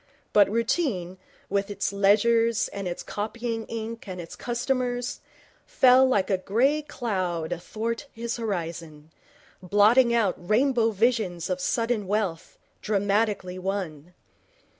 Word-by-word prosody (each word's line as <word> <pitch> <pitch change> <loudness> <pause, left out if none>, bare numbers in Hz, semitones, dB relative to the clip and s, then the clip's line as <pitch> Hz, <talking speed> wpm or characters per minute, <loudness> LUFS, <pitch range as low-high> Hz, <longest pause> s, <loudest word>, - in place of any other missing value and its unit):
But 205 -2 +6
routine, 220 - -1 0.3
with 200 +1 -1
its 200 0 -2
ledgers 220 +3 +3
and 200 -2 -5
its 175 - -5
copying 225 +2 -4
ink 230 0 -6
and 185 -1 -6
its 165 -1 -8
customers, 245 0 -2 0.5
fell 260 +1 +5
like 205 -6 +1
a 190 - +2
grey 260 +11 +2
cloud 185 - -3
athwart 225 +9 -4
his 235 +1 -4
horizon, 165 -7 -5 0.5
blotting 210 +7 +4
out 225 -5 +2
rainbow 230 +5 +2
visions 210 -6 0
of 185 0 -2
sudden 230 -1 0
wealth, 200 -5 -2 0.2
dramatically 200 -2 0
won. 180 -4 -4
210 Hz, 120 wpm, -26 LUFS, 185-235 Hz, 0.5 s, But